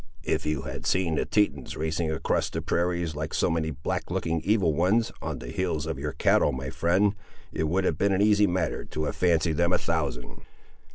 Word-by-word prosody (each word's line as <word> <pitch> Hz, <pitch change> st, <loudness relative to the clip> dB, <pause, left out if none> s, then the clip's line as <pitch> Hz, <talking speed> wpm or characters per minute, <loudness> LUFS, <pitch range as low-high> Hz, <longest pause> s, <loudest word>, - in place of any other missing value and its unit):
"If -, -, -1 dB
you 75 Hz, -3 st, -1 dB
had -, -, -5 dB
seen 90 Hz, -3 st, +1 dB
the 75 Hz, -, 0 dB
Tetons 75 Hz, -11 st, 0 dB
racing 80 Hz, +1 st, -1 dB
across 80 Hz, -, 0 dB
the -, -, -3 dB
prairies, 85 Hz, -2 st, -1 dB
like 75 Hz, +1 st, -4 dB
so 90 Hz, -, +2 dB
many 80 Hz, -1 st, 0 dB
black 75 Hz, 0 st, -3 dB
looking 80 Hz, -1 st, -1 dB
evil 100 Hz, -5 st, +2 dB
ones, 95 Hz, +9 st, +2 dB
on -, -, -4 dB
the -, -, -8 dB
heels 80 Hz, -2 st, -2 dB
of 80 Hz, -4 st, -4 dB
your 75 Hz, 0 st, -3 dB
cattle, -, -, +3 dB
my 65 Hz, +1 st, -5 dB
friend, 95 Hz, +4 st, +2 dB, 0.4 s
it 80 Hz, -, -1 dB
would 90 Hz, +5 st, +1 dB
have -, -, 0 dB
been 100 Hz, -, +3 dB
an 95 Hz, -, +2 dB
easy 105 Hz, 0 st, +4 dB
matter 90 Hz, -3 st, -1 dB
to 75 Hz, -, -4 dB
have -, -, -2 dB
fancied 85 Hz, -3 st, +2 dB
them 85 Hz, 0 st, +2 dB
a -, -, +5 dB
thousand." 75 Hz, -8 st, -3 dB
85 Hz, 210 wpm, -27 LUFS, 75-95 Hz, 0.4 s, a